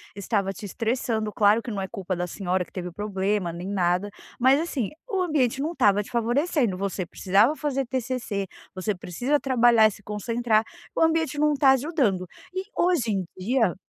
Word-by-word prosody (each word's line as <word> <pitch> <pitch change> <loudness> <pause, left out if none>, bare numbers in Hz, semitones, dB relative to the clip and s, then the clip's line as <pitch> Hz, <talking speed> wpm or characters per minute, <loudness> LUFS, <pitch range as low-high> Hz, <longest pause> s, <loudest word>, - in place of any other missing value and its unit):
estava 200 -1 -1
te 205 - -9
estressando. 220 0 -1
Claro 210 +2 +4
que 235 - -6
não 200 -2 -3
é 190 - -3
culpa 190 -3 -4
da 175 0 -2
senhora 185 0 -1
que - - -24
teve 180 -1 -5
problema, 200 -1 -1
nem 175 +2 -6
nada, 185 0 +1 0.3
mas 260 +3 +5
assim, 285 - -2 0.2
o 385 -4 0
ambiente 275 -8 +1
não 315 +4 -1
estava 205 - +3
te 250 - -14
favorecendo. 240 - +1
Você 195 -1 -2
precisava 200 - +2
fazer 275 -3 -1
TCC, 245 -6 -3 0.3
você 190 +3 -2
precisa 245 - -1
trabalhar 240 -4 +5
e - - -2
se 205 - -13
concentrar, 220 +1 0 0.3
o - - 0
ambiente 320 -2 +2
não 300 0 +3
tá 275 -1 +5
ajudando. 265 - +1 0.3
E 375 +1 -2
hoje 345 -11 +2
em 190 -3 -1
dia 225 0 +1
220 Hz, 180 wpm, -25 LUFS, 195-265 Hz, 0.3 s, mas